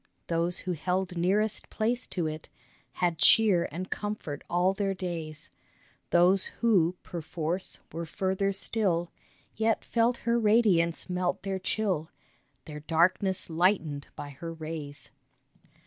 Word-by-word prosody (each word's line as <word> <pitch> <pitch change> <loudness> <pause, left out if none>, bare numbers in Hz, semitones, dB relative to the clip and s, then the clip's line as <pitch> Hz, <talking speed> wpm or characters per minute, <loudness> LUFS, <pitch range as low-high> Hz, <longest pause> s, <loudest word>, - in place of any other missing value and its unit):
Those 170 +2 +1
who 185 - 0
held 180 +3 -2
nearest 200 +5 +2
place 235 +3 -1
to 175 -3 -2
it 155 0 -5 0.4
Had 175 -3 -1
cheer 200 -5 +5
and 180 +4 -5
comfort 205 -9 -4
all 180 +2 +2
their 195 -1 -1
days; 165 -4 -5 0.6
Those 180 +2 +5
who, 185 -7 +2
perforce, 170 +1 -4
were 165 +1 -5
further 190 +3 -1
still 190 -4 0 0.4
Yet 225 0 0
felt 235 +1 +1
her 235 0 0
radiance 210 -7 +3
melt 180 -1 -2
their 195 -1 -2
chill, 185 -5 -1 0.6
Their 150 -2 -8
darkness 175 +5 +1
lightened 165 -4 0
by 145 - -7
her 165 +4 -7
rays. 155 -3 -6
180 Hz, 125 wpm, -28 LUFS, 165-195 Hz, 0.6 s, cheer